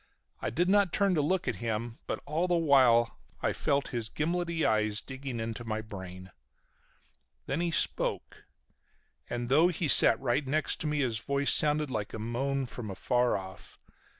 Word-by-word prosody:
I - - -1
did 170 +11 0
not 200 -2 +3
turn 200 0 +2
to 155 - +2
look 185 +5 0
at - - -1
him 115 0 -4
but - - -4
all 165 +4 -1
the 175 - +2
while 130 -7 +4 0.2
I - - +1
felt 140 -1 0
his 115 -3 -4
gimlety 170 +2 -1
eyes 110 -1 +1
digging 130 -1 -7
into 115 +1 -4
my 110 -1 -3
brain. 95 -3 -9 1.1
Then 140 +5 -2
he 175 - 0
spoke. 165 - 0 0.8
And 120 0 -3
though 150 +7 +5
he 175 -2 -2
sat 115 -4 +6
right 135 +3 -1
next 155 +3 -1
to 155 - -2
me 150 -1 0
his 120 -4 -1
voice 140 +3 +1
sounded 150 -2 +1
like 105 -4 -4
a - - -4
moan 130 +5 -2
from 120 -3 -7
afar 120 +5 +1
off. 95 0 -10
130 Hz, 175 wpm, -29 LUFS, 115-155 Hz, 1.1 s, sat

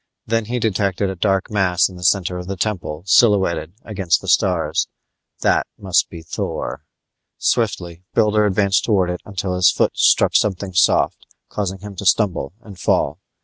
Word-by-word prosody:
Then 115 0 0
he 120 +3 -3
detected 100 -3 0
a - - -6
dark 95 +2 0
mass 95 -4 +2
in 95 - -12
the 90 - -10
center 90 -1 +1
of 90 - -8
the 95 0 -4
temple 90 -6 -3
silhouetted 95 -5 +3
against 95 -6 0
the - - -11
stars; - - +1 0.5
that - - +2
must 95 -3 +1
be 85 -2 -10
Thor. - - -4 0.6
Swiftly 85 -1 -1
Builder 105 -1 +3
advanced 100 -1 +2
towards 95 -5 +1
it 90 - -7
until 95 -2 -3
his 90 0 +4
foot - - 0
struck - - +3
something 95 -2 0
soft, 90 - +2 0.2
causing 95 -2 -4
him 105 -1 -9
to 100 - -3
stumble 90 -6 +1
and 100 -4 -13
fall. - - 0
95 Hz, 165 wpm, -20 LUFS, 90-105 Hz, 0.6 s, his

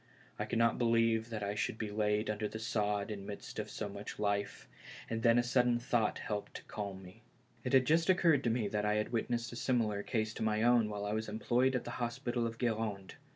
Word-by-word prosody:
I - - 0
could - - -2
not 115 0 +3
believe 115 -1 +2
that 110 -2 -4
I 100 0 -1
should 105 +1 -2
be 110 -2 -4
laid 105 0 +1
under 105 0 -1
the 110 - -6
sod 105 -2 -1
in 100 -2 -5
the - - -10
midst 100 - -7
of - - -4
so 105 - -4
much 100 +1 -7
life, 100 -1 -1 0.4
and 115 0 -2
then 115 0 +5
a 120 - +4
sudden 125 -1 +3
thought 120 -2 +1
helped 105 -1 -4
to - - -7
calm 100 -2 -6
me. 90 0 -14 0.4
It - - -3
had 130 -1 +6
just 165 +5 +3
occurred 165 -6 +4
to - - +3
me 115 -2 0
that 105 0 -1
I 105 0 +2
had 105 0 -1
witnessed 115 0 -1
a - - -7
case - - -4
similar 110 -5 +1
to 110 0 -2
my 110 0 +1
own 120 -2 +4
while 105 -1 -4
I 105 - -1
was 110 +1 -2
employed 120 +4 +1
at 125 - -1
the - - -6
hospital 120 0 -1
of 115 0 -6
Gud 115 -3 +1
rande. 100 -4 -4
110 Hz, 245 wpm, -34 LUFS, 105-120 Hz, 0.4 s, had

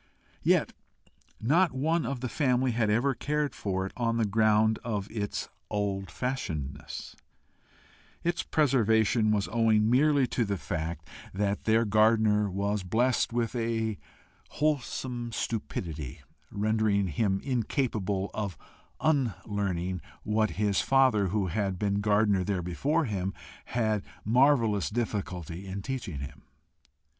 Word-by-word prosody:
Yet - - +2 0.7
not 160 +8 +3
one 155 +2 0
of 130 -1 -3
the 130 - -1
family 130 -2 +1
had 115 -2 +1
ever 120 +6 +2
cared 150 +2 -1
for 95 -2 -2
it 95 - -7
on 115 -1 0
the 115 - +2
ground 110 +1 +3
of 105 -4 -2
its 105 -2 -3 0.2
old 100 -2 -2
fashionedness; 80 - -4 1.1
its 175 0 0
preservation 110 -6 +3
was 105 -1 +1
owing 110 -1 +3
merely 140 +1 +4
to 120 - 0
the 100 -2 -1
fact 80 +3 -4 0.3
that 100 0 -1
their 115 +1 +3
gardener 110 -1 +3
was 100 +2 -1
blessed 115 +8 +1
with 120 +1 -1
a 115 -2 -1 0.5
wholesome 130 -5 -2
stupidity 80 - -4 0.3
rendering 105 -2 +1
him 95 +5 +1
incapable 110 -6 -1
of 100 -7 -3 0.4
unlearning 100 - 0 0.2
what 110 0 +1
his 105 -1 +2
father, 130 -7 +3
who 100 +1 0
had 95 +1 -1
been 100 +1 0
gardener 105 -2 +3
there 95 -2 -1
before 140 - 0
him, 95 -4 -2 0.3
had 110 -3 0
had - - -20
marvellous 115 - +3
difficulty 95 -6 -3
in 95 +1 -5
teaching 110 - -4
him. 70 0 -8
110 Hz, 125 wpm, -29 LUFS, 100-120 Hz, 1.1 s, merely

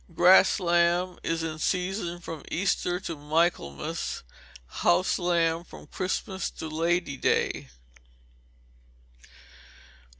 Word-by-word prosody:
_Grass 185 +4 +6
lamb 175 0 +2
is 165 0 -2
in 155 -1 -4
season 180 0 -1
from 165 -3 -7
Easter 180 -1 0
to 170 - -4
Michaelmas; 150 - -1 0.4
house 175 - +1
lamb 170 -2 +1
from - - -13
Christmas 190 +1 -3
to 160 - -7
Lady 165 -1 0
day. 70 - 0
175 Hz, 95 wpm, -27 LUFS, 165-180 Hz, 0.4 s, Grass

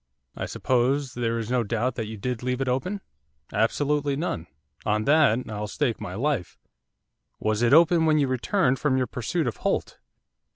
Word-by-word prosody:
'I - - -4
suppose 130 +1 0
there 115 -1 -1
is 115 +1 -4
no 125 -1 +2
doubt 120 +3 -1
that 115 -3 -4
you 110 0 -7
did 125 +3 -3
leave 125 0 -1
it 135 - -1
open?' 180 +11 -1 0.5
'Absolutely 145 +6 +1
none, 135 - -3 0.4
on 105 +1 +1
that 140 -4 +3
I'll 105 -1 -4
stake 120 +1 -1
my 90 - -5
life.' 130 - -1 0.8
'Was 110 +1 0
it 120 0 +3
open 165 +1 +6
when 155 -1 +4
you 145 -2 +2
returned 130 - +1
from 140 -3 +1
your 130 - +2
pursuit 125 +8 -2
of 115 -6 -2
Holt? - - -2
125 Hz, 175 wpm, -25 LUFS, 115-145 Hz, 0.8 s, open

